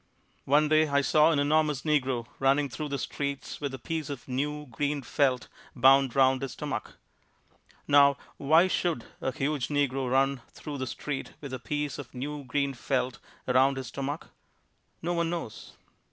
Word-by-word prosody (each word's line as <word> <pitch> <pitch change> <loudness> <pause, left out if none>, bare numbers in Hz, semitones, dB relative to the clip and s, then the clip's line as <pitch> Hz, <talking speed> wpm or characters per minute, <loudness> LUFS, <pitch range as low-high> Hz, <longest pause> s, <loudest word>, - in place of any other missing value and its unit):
One 150 +3 +4
day 155 +1 +4
I 140 -1 +2
saw 150 +2 +4
an 160 - +2
enormous 150 -1 +2
negro 130 -6 +1
running 140 +1 +3
through 150 +3 -5
the 140 - -2
streets 140 +1 -4
with 140 -2 -2
a 135 - -6
piece 155 +3 -4
of 140 -3 -7
new, 150 +3 -2
green 145 +2 -2
felt 130 -1 +1 0.3
bound 135 0 +5
around 130 -1 +4
his 135 -2 -4
stomach. 145 -7 -5 0.9
Now 140 -1 +6 0.2
why 160 +6 +5
should 170 -8 -1 0.2
a 130 - -1
huge 135 0 -1
negro 135 -3 0
run 135 0 +2
through 145 -2 -7
the 130 - -2
street 135 +4 -5
with 140 -3 -8
a 130 - -3
piece 145 +2 -3
of 130 -2 -9
new 145 +3 -4
green 140 +2 0
felt 130 0 -2 0.3
around 130 +2 +4
his 130 - -4
stomach? 140 +3 -4 0.7
No 175 +1 0
one 170 -1 0
knows. 165 -11 -6
140 Hz, 165 wpm, -28 LUFS, 130-150 Hz, 0.9 s, Now